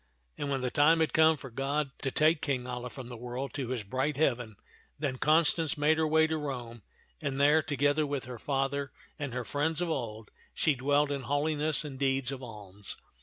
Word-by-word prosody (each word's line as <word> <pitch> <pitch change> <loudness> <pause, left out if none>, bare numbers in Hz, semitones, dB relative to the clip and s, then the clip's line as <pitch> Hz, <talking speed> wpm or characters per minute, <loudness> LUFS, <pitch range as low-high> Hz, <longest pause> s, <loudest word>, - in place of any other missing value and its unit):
And 145 - -3
when 135 -2 0
the 125 -1 -1
time 160 +3 +5
had 160 - +1
come 160 0 +5
for 135 -2 -10
God 140 +3 -1
to 135 - 0
take 155 +3 +3
King 130 -3 -1
Alia 125 0 -5
from 130 -1 -9
the 120 - -7
world 125 +3 -5
to 135 -4 -3
his 125 -3 -3
bright 130 +7 -1
heaven, 120 -7 0 0.4
then 135 -4 -2
Constance 160 +1 +3
made 155 +2 +3
her 160 - +2
way 160 +1 +4
to 160 0 -1
Rome, 120 -5 -5 0.4
and 135 -1 -2
there, 150 +3 +5
together 145 0 +1
with 140 -2 -3
her 125 -2 -8
father 135 +1 -1 0.3
and 145 -3 -3
her 125 0 -3
friends 150 +5 -1
of 175 -1 -1
old, 110 -6 -4 0.2
she 155 - +3
dwelt 145 +2 +2
in 140 -1 -2
holiness 150 +3 +1
and 135 -3 -7
deeds 135 -1 +1
of 135 -1 -6
alms. 105 -4 -8
140 Hz, 205 wpm, -30 LUFS, 125-150 Hz, 0.4 s, time